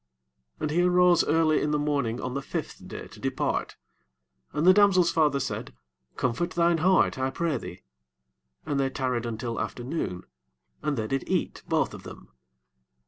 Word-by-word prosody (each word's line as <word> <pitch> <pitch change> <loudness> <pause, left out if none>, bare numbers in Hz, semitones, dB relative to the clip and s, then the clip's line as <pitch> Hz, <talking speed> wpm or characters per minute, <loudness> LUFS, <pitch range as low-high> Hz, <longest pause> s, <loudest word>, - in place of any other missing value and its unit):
8 - - -25
And 150 - 0
he 170 +3 +2
arose 180 -1 +5
early 155 0 +3
in 150 - 0
the 150 - +1
morning 140 -6 -1
on 125 - -4
the 140 - -2
fifth - - -6
day - - -7
to - - -14
depart: - - -2 0.8
and 150 +3 -1
the 185 - +8
damsel's 185 -4 +5
father 150 -3 +2
said, 125 - -4 0.4
Comfort 130 +8 0
thine 170 -1 +3
heart, 185 -5 +3
I 130 0 +1
pray 165 +2 -1
thee. 90 - -9 0.8
And 145 -2 -1
they 135 -1 +1
tarried 125 -3 -2
until 115 +1 -3
afternoon, 120 - -4 0.6
and 150 -2 -1
they 110 - -1
did 135 +4 -3
eat - - -1
both - - +1
of - - -9
them. - - -12
145 Hz, 170 wpm, -27 LUFS, 125-170 Hz, 0.8 s, the